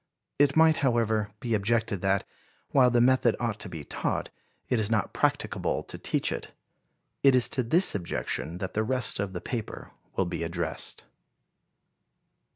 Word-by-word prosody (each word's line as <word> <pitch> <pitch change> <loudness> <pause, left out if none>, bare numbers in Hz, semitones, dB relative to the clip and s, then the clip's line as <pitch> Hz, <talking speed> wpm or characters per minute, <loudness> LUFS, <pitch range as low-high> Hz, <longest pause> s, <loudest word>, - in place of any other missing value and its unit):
It 140 -2 +4
might, 160 0 +5
however, 110 -5 +1
be 120 -2 -2
objected 110 -1 0
that, 95 0 +1 0.5
while 130 -2 +5
the 120 0 +3
method 125 -1 +4
ought 115 -3 -2
to 95 - -5
be 80 -4 -7
taught, - - -3 0.4
it 125 - +1
is 105 -1 +1
not 110 -3 0
practicable - - 0
to - - -7
teach - - 0
it. - - -4 0.7
It 135 -2 +6
is 125 - +5
to 130 - 0
this 165 +11 +3
objection 85 -3 -2
that 95 0 -5
the 110 - +1
rest 125 -2 +1
of 100 -1 -2
the 90 - -5
paper 115 -4 -5 0.2
will 95 - +1
be 85 -2 -4
addressed. 85 0 -4
110 Hz, 160 wpm, -28 LUFS, 95-125 Hz, 0.7 s, It